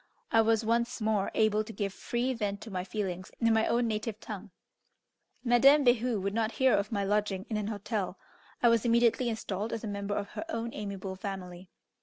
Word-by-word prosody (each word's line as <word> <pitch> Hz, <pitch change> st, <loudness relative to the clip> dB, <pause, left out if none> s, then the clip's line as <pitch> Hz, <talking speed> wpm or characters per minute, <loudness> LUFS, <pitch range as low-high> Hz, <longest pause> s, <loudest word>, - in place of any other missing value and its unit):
I 225 Hz, -, +6 dB
was 225 Hz, 0 st, +2 dB
once 235 Hz, +2 st, +1 dB
more 215 Hz, -3 st, +1 dB
able 215 Hz, -1 st, +3 dB
to 220 Hz, -, -9 dB
give 200 Hz, -3 st, -3 dB
free 245 Hz, +5 st, -1 dB
vent 205 Hz, -4 st, -2 dB
to 225 Hz, -, -8 dB
my 180 Hz, -1 st, -2 dB
feelings 185 Hz, -1 st, -4 dB
in 230 Hz, -1 st, +3 dB
my 220 Hz, 0 st, +3 dB
own 235 Hz, +1 st, +2 dB
native 215 Hz, 0 st, -3 dB
tongue. 210 Hz, -2 st, -7 dB, 0.9 s
Madame 270 Hz, +4 st, +6 dB
Behu 240 Hz, -2 st, +3 dB
would 200 Hz, +1 st, -2 dB
not 225 Hz, 0 st, 0 dB
hear 260 Hz, -1 st, +3 dB
of 200 Hz, +2 st, +1 dB
my 200 Hz, -2 st, 0 dB
lodging 200 Hz, -1 st, 0 dB
in 215 Hz, -, 0 dB
an 210 Hz, -1 st, -2 dB
hotel; 205 Hz, -3 st, -3 dB, 0.5 s
I 240 Hz, -, +7 dB
was 230 Hz, -2 st, +3 dB
immediately 235 Hz, +1 st, +3 dB
installed 215 Hz, -1 st, -3 dB
as 225 Hz, -, -4 dB
a -, -, -3 dB
member 200 Hz, 0 st, -3 dB
of 200 Hz, -1 st, -3 dB
her -, -, -6 dB
own 230 Hz, -5 st, -3 dB
amiable 195 Hz, -2 st, -5 dB
family. 185 Hz, -2 st, -6 dB
215 Hz, 200 wpm, -30 LUFS, 200-230 Hz, 0.9 s, I